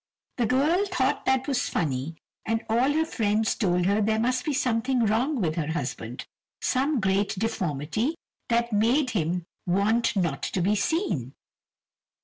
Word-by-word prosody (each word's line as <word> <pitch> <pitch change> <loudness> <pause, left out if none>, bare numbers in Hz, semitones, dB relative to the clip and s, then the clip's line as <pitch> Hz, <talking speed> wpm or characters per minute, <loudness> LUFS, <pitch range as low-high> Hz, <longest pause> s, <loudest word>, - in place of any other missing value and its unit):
The 240 -3 +1
girl 300 - +3
thought 275 -9 0
that 265 0 +2
was 270 -3 0
funny, 145 0 -2 0.3
and 225 0 -1
all 240 +5 +2
her 315 +2 +1
friends 220 -5 +1
told 180 -4 +1
her 200 +3 +2
there 220 +1 +2
must 250 +2 +1
be 305 - 0
something 250 -2 +1
wrong 245 +7 +1
with 165 -6 0
her 155 -3 -1
husband, 175 - -4 0.3
some 275 +1 +1
great 195 0 +1
deformity 195 - -1 0.3
that 235 0 +1
made 250 +6 +2
him 175 -3 -1 0.2
want 215 +6 +2
not 170 -8 0
to 185 - -2
be 200 +4 +3
seen. 200 - -1
225 Hz, 150 wpm, -26 LUFS, 190-260 Hz, 0.3 s, girl